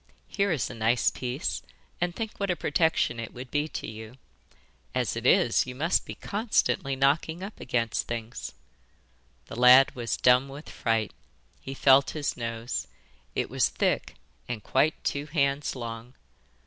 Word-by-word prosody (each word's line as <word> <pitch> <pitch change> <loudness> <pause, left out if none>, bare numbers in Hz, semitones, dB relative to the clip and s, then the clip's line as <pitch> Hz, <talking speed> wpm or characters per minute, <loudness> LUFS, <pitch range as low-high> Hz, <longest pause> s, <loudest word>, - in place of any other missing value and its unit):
Here 200 -1 0
is 150 -8 0
a - - -7
nice 115 +1 +2
piece; 125 +4 -3 0.4
and 175 0 0
think 220 -2 -5
what 200 -1 -1
a 180 - +2
protection 160 -10 +1
it 115 +1 -7
would 125 0 -8
be 150 +1 0
to - - -6
you. 110 +3 -9 0.8
As - - 0
it - - -1
is, - - +4
you 125 - -6
must 165 +7 +1
be - - -6
constantly 205 - 0
knocking 155 +6 +1
up 200 +2 -8
against 115 -2 -1
things.' 115 -1 -5 0.9
The - - -9
lad 125 +2 +8
was 120 -2 -2
dumb 125 +2 +4
with 140 +3 -10
fright. 115 -2 -1 0.5
He 135 - -7
felt 135 0 +5
his 145 -3 -1
nose. 115 0 -4 0.5
It - - 0
was - - +1
thick, - - -1 0.3
and 115 -4 -4
quite 150 +4 +1
two 145 +1 -2
hands 140 -2 0
long. 115 0 -7
130 Hz, 160 wpm, -27 LUFS, 120-150 Hz, 0.9 s, lad